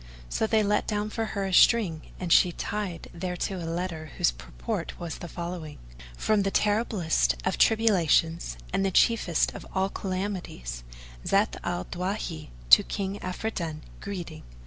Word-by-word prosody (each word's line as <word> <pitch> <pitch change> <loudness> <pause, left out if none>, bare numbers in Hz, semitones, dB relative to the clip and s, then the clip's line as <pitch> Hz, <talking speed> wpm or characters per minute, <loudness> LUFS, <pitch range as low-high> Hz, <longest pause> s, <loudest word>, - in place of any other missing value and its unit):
So 220 - 0
they 220 -1 +3
let 210 0 +1
down 210 0 -1
for 225 0 -1
her 195 - 0
a 190 - -3
string 180 -7 +5 0.2
and 175 -2 +2
she 180 - +6
tied 195 -1 -4
thereto 180 +2 -3
a 165 - -4
letter 165 -3 -4
whose - - +3
purport - - -5
was 170 -2 -5
the 175 - -6
following: 170 -3 -6 0.4
"From 215 -1 +2
the 195 - +1
terriblest 195 - +2
of - - 0
tribulations[FN#445] 170 - +3 0.2
and - - +2
the 195 - +2
chiefest 190 -4 +3
of - - -8
all 190 +1 +2
calamities, 185 - -4 0.4
Zat - - +2
al 90 - -2
Dawahi, 180 - -4 0.2
to 65 - +11
King 200 0 -4
Afridun 180 -5 -4 0.2
greeting. 175 -5 -6
180 Hz, 150 wpm, -27 LUFS, 165-205 Hz, 0.4 s, to